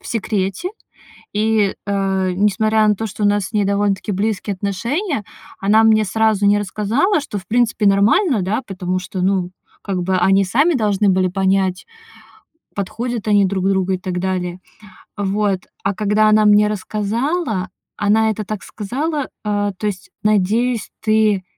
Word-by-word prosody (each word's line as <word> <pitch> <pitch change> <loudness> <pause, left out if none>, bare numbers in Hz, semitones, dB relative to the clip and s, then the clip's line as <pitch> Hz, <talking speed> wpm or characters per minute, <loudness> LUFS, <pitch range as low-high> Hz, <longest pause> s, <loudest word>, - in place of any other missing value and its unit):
в - - -14
секрете, 205 - -2 0.7
и, 215 -1 +2
э, 195 -2 0
несмотря 215 +3 +2
на 210 - +4
то, 220 +3 -3
что 210 +1 -7
у - - +5
нас 205 -1 +1
с - - -19
ней 210 -2 +1
довольно-таки 200 0 0
близкие 205 +1 -1
отношения, 230 - -2 0.4
она 210 +3 +4
мне 215 -1 +4
сразу 215 0 +1
не 205 +1 +4
рассказала, 215 - 0
что, 280 -7 -6
в 185 - -12
принципе, 230 -1 +1
нормально, 210 - +3
да, 205 +8 -1
потому 185 -2 -3
что, 185 0 -6
ну, 185 -1 +1 0.3
как 190 -3 -2
бы 185 +1 0
они 195 +2 +3
сами 280 - +2
должны 210 -4 +1
были 185 0 +2
понять, 190 0 0 0.9
подходят 225 +3 -4
они 205 -1 +4
друг 190 0 -1
другу 190 -1 +1
и 185 - -1
так 180 -1 -4
далее. 180 -1 -3 0.6
Вот. 200 -1 0 0.2
А 200 - 0
когда 215 +1 +2
она 215 0 +4
мне 210 0 +5
рассказала, 215 - -2 0.3
она 220 +2 +2
это 215 0 -3
так 215 -1 -5
сказала: 275 +7 -3 0.2
"Э, 205 -1 0
то 210 - -3
есть, 190 -2 -4
надеюсь, 215 +3 +1
ты, 215 -3 +2
205 Hz, 160 wpm, -19 LUFS, 190-220 Hz, 0.9 s, у